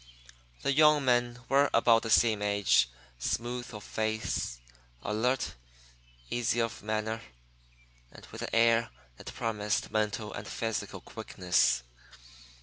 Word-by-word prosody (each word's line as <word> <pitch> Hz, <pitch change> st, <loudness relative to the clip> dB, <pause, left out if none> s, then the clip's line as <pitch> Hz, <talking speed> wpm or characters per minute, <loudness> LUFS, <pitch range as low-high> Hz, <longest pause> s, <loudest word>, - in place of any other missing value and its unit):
The 140 Hz, -, +2 dB
young 150 Hz, -1 st, +5 dB
men 120 Hz, 0 st, +1 dB
were 140 Hz, +2 st, +4 dB
about 115 Hz, 0 st, +5 dB
the 115 Hz, -, -5 dB
same 110 Hz, -2 st, +4 dB
age, 100 Hz, -11 st, +3 dB, 0.3 s
smooth 120 Hz, -, -3 dB
of 105 Hz, -2 st, -8 dB
face, 110 Hz, -, -2 dB, 0.5 s
alert, 120 Hz, +5 st, 0 dB, 0.8 s
easy 120 Hz, 0 st, 0 dB
of 115 Hz, -1 st, -2 dB
manner, 110 Hz, +1 st, -2 dB, 0.9 s
and -, -, -13 dB
with -, -, -8 dB
an -, -, -3 dB
air 115 Hz, 0 st, +4 dB, 0.3 s
that -, -, -9 dB
promised 105 Hz, -2 st, -2 dB
mental 105 Hz, 0 st, -1 dB
and -, -, -7 dB
physical 115 Hz, -1 st, -3 dB
quickness. 60 Hz, -1 st, 0 dB
115 Hz, 120 wpm, -30 LUFS, 105-120 Hz, 0.9 s, young